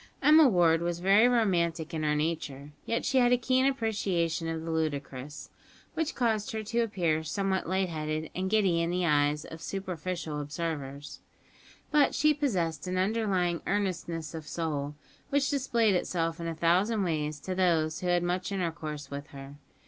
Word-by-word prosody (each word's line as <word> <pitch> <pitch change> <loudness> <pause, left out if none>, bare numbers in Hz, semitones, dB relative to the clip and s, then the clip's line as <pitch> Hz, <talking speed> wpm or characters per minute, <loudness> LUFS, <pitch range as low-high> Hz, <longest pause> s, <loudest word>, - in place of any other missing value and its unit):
Emma 305 +1 +7
Ward 170 -5 +4
was 170 0 -2
very 200 +6 +5
romantic 170 -9 +1
in 160 - -2
her 150 -1 +1
nature; 150 -2 -3 0.2
yet 230 - -1
she 265 - +3
had 245 -1 +4
a 250 - +5
keen 255 +2 +2
appreciation 195 -10 0
of 165 0 -3
the 165 - -3
ludicrous, 145 -3 -4 0.4
which 320 -1 -2
caused 225 -1 0
her 220 0 -3
to 230 +3 -1
appear 175 -9 +1
somewhat 190 +2 -1
light 190 0 +1
headed 155 -1 -3
and 190 +1 -2
giddy 190 -5 +3
in 170 - 0
the 180 0 0
eyes 150 -1 +2
of 160 - -10
superficial 180 -4 -4
observers; 145 -2 -5 0.7
but 295 -2 +4
she 305 +1 +4
possessed 185 - -1
an 185 0 -2
underlying 190 -4 +1
earnestness 170 -6 -2
of 160 -2 -7
soul, 150 -4 -3 0.3
which 280 0 +1
displayed 235 -6 +2
itself 165 -2 -1
in 170 - -4
a 165 - -3
thousand 185 +7 +2
ways 155 -4 -2
to 185 +6 -4
those 165 -4 +1
who 180 - -4
had 175 0 +2
much 180 +2 -1
intercourse 155 -6 -4
with 140 +1 -6
her. 135 0 -10
175 Hz, 170 wpm, -29 LUFS, 155-205 Hz, 0.7 s, Emma